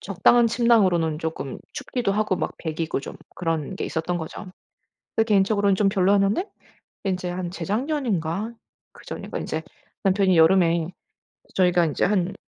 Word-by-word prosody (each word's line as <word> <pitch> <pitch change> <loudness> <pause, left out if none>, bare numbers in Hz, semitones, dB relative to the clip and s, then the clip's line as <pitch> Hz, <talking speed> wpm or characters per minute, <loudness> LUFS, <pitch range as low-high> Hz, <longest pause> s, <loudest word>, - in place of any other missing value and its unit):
적당한 230 +5 +4
침낭으로는 195 -10 +3
쪼끔 160 -5 -4
춥기도 240 -6 -2
하고 210 -2 +1
막 155 -3 -3
배기고 160 -2 -3
좀 - - -8 0.2
그런 165 0 -2
게 - - -3
있었던 165 +2 -2
거죠. 170 +5 -6 0.7
근데 225 - +3
개인적으로는 200 -1 +3
좀 195 0 +3
별로였는데 195 - +2 0.6
인제 185 -2 -1
한 175 0 -4
재작년인가 210 - -2 0.4
그전인가 - - -7
인제 - - -3 0.4
남편이 190 -1 +3
여름에 165 -1 +4 0.7
저희가 180 -2 +4
인제 150 - 0
한 190 -2 +1
185 Hz, 325 characters per minute, -24 LUFS, 165-205 Hz, 0.7 s, 적당한